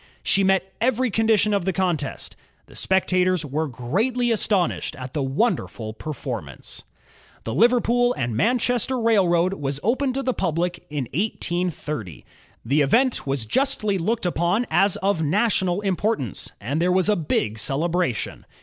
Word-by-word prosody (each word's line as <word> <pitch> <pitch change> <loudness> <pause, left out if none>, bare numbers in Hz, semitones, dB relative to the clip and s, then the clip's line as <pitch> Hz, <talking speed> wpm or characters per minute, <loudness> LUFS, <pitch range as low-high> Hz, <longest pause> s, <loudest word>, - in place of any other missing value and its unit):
She 195 - +2
met 190 0 +1
every 255 0 +1
condition 220 -1 +2
of 200 -3 +1
the 190 - 0
contest. 170 -6 -2 0.3
The - - -17
spectators 185 -2 +1
were 150 +3 -2
greatly 215 - -1
astonished 200 -5 0
at 130 -1 -8
the 150 - -1
wonderful 135 - -1
per 135 - -8
formance. 115 - -6 0.6
The 115 - -4
Liverpool 245 - +3
and 120 -3 -2
Manchester 245 - +1
Railroad 185 -6 +3
was 140 -6 -3
opened 260 +4 +1
to 275 - -1
the 255 - 0
public 175 -1 -2
in 145 -2 -2
1830. 170 - -3 0.4
The 140 +6 +2
event 235 - +2
was 135 -4 -1
justly 215 - +1
looked 215 +4 -1
upon 175 +6 +1
as 195 +1 +3
of 195 -4 +1
national 190 +2 +1
importance, 195 - -1
and 140 +9 -2
there 180 +1 +2
was 185 0 +2
a 210 - +4
big 110 - -1
celebration. 155 +1 -1
180 Hz, 145 wpm, -23 LUFS, 145-220 Hz, 0.6 s, a